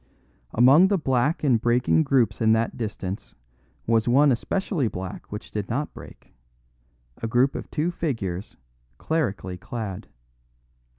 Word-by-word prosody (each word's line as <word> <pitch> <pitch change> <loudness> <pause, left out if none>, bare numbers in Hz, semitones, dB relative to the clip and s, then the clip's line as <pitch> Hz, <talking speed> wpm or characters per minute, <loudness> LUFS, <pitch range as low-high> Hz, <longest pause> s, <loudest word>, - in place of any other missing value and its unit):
Among 135 +10 +7
the 200 0 +2
black 135 0 0
and 125 -6 +3
breaking 120 +6 +3
groups 120 -8 +2
in 110 0 +5
that 110 +1 0
distance 105 -3 -5 0.5
was 115 0 +2
one 140 +4 +5
especially 155 - -1
black 95 -3 -7
which 105 +1 -7
did 105 -3 -4
not 145 +6 -2
break - - -13 0.9
a 115 - -2
group 125 +4 +2
of - - -6
two 160 +3 -1
figures 110 - -4 0.4
clerically 100 - -2
clad. 95 -4 -6
120 Hz, 130 wpm, -25 LUFS, 105-145 Hz, 0.9 s, Among